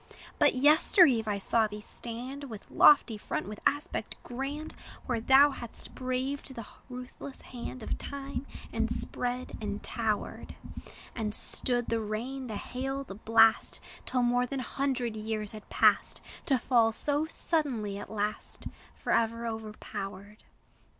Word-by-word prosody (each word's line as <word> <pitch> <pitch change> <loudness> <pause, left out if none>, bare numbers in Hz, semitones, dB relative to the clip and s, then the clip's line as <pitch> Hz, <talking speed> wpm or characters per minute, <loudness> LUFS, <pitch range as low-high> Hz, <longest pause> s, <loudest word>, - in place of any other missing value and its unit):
But - - +5
yester 300 +7 +7
eve 230 -7 +2
I 205 -1 0
saw 220 +3 +2
thee 210 0 -7
stand, 245 +6 -6
With 220 -6 -10
lofty 235 -7 +6
front, - - -3
with 210 0 -7
aspect 290 +5 -2
grand, 275 +5 -4 0.3
Where 240 -2 0
thou 270 +5 +6
hadst 235 -4 -8
braved 260 +2 -3
the 230 - -6 0.2
ruthless 250 +2 -8
hand 250 -1 -7
Of - - -3
time, 280 0 -5 0.3
and - - 0
spread, 250 +1 -3
and 205 -1 -4
towered; 220 -2 -2 0.6
And 215 -2 -1
stood 245 -2 +1
the 230 - +1
rain, 245 +5 -4
the 220 - -4
hail, 270 +5 -3
the 195 - -8
blast, 225 +2 +4 0.3
Till 250 -1 +2
more 245 +1 +2
than 270 +1 -3
hundred 255 -3 -1
years 215 -1 -3
had 215 -1 -11
passed: - - +3 0.3
To 270 -5 +4
fall 235 -2 +3
so 290 +7 -1
suddenly 250 -12 -1
at - - -8
last, 210 0 -1 0.3
Forever 230 +1 +1
overpowered! 210 -2 -6
240 Hz, 140 wpm, -30 LUFS, 215-270 Hz, 0.6 s, yester